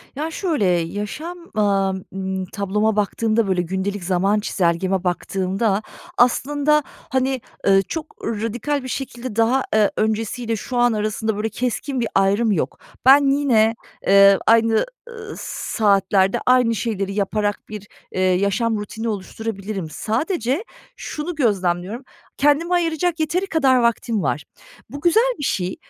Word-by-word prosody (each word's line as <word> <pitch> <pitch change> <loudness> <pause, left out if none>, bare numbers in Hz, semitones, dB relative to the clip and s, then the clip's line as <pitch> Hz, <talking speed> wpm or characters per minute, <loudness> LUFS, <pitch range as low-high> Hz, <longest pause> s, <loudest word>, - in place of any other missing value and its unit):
Ya 315 +3 -3
şöyle, 320 - -1
yaşam, 205 - -2 0.2
aaa, 195 -2 +2 0.2
ımm, 190 -1 -3
tabloma 210 +3 -1
baktığımda, 215 +1 +1
böyle, 185 -2 +1
gündelik 190 +2 -3
zaman 195 +3 +1
çizelgeme 185 0 0
baktığımda 195 +3 -1 0.4
aslında, 290 +4 +3
hani, 260 -1 -2 0.3
ııı, 195 0 +6
çok 315 - -6
radikal 230 +6 -2
bir - - -6
şekilde 255 -3 -5
daha, 240 +4 +2
eee, 215 -2 +4
öncesiyle 225 +2 -1
şu 245 +4 -5
an 240 -1 +4
arasında, 215 0 -1
böyle, 220 +1 -1
keskin 250 +4 -2
bir 230 - 0
ayrım 200 +3 +3
yok. 150 -8 -1 0.3
Ben 280 +2 +7
yine, 230 -5 +3 0.3
eee, 200 0 +7
aynı, 225 - +4 0.2
ııı, 450 -2 -8
saatlerde 195 -2 +1
aynı 250 -2 +4
şeyleri 200 -2 -2
yaparak 205 +1 -1
bir, 210 -1 -8 0.2
eee, 185 - -2
yaşam 200 +5 +1
rutini 220 +2 -5
oluşturabilirim. 200 -2 -5
Sadece 260 - -1 0.3
şunu 315 +3 -5
gözlemliyorum, 200 - 0 0.3
kendime 295 +5 +2
ayıracak 335 0 0
yeteri 355 +5 0
kadar 275 -7 +3
vaktim 235 -3 +1
var. 145 +2 -1 0.5
Bu 285 +3 -8
güzel 450 +9 +3
bir - - -4
şey. 185 -6 -1
220 Hz, 130 wpm, -21 LUFS, 195-260 Hz, 0.5 s, Ben